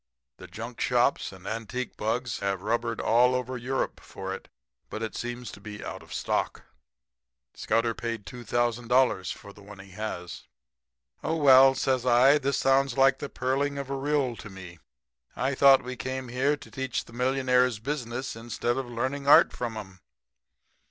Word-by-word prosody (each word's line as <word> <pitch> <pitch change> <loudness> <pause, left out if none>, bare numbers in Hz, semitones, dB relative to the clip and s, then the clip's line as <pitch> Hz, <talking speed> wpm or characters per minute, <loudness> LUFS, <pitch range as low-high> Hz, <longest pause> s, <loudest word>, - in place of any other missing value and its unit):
The - - -11
junkshops - - 0
and 95 -1 -14
antique 115 +4 -4
bugs 115 +1 -2
have 100 -1 -2
rubbered 115 +1 -1
all 125 +2 +2
Europe 125 +2 -2
for 95 0 -7
it, - - -9 0.4
but 110 - -5
it 110 - -4
seems 120 0 -5
to 100 - -12
be 105 0 -8
out - - -6
of - - -16
stock. - - -2 0.9
Scudder 115 +1 0
paid 115 -3 -5
$2,000 120 -3 0
for 100 - -10
the 100 - -16
one 100 0 -12
he 95 0 -13
has.' 95 -3 -6 0.8
"'Oh, 160 - 0
well,' 135 -3 +7
says 130 -2 0
I, 130 +4 +5
'this 140 -1 0
sounds 135 -1 +2
like 135 0 +4
the 145 - -5
purling 135 +3 -1
of 140 -1 -5
a - - -1
rill 135 -3 0
to 105 - -9
me. 90 -3 -11 0.6
I 135 +2 0
thought 135 0 +6
we 125 0 -5
came 130 0 -5
here 135 +4 +1
to - - -14
teach 135 -2 -3
the - - -16
millionaires 125 -1 +2
business, 125 0 -4
instead 120 +1 -2
of 135 -2 -3
learning 130 +4 -3
art 145 - +7
from 115 -2 -4
'em?' 95 -3 -9
125 Hz, 165 wpm, -27 LUFS, 110-135 Hz, 0.9 s, well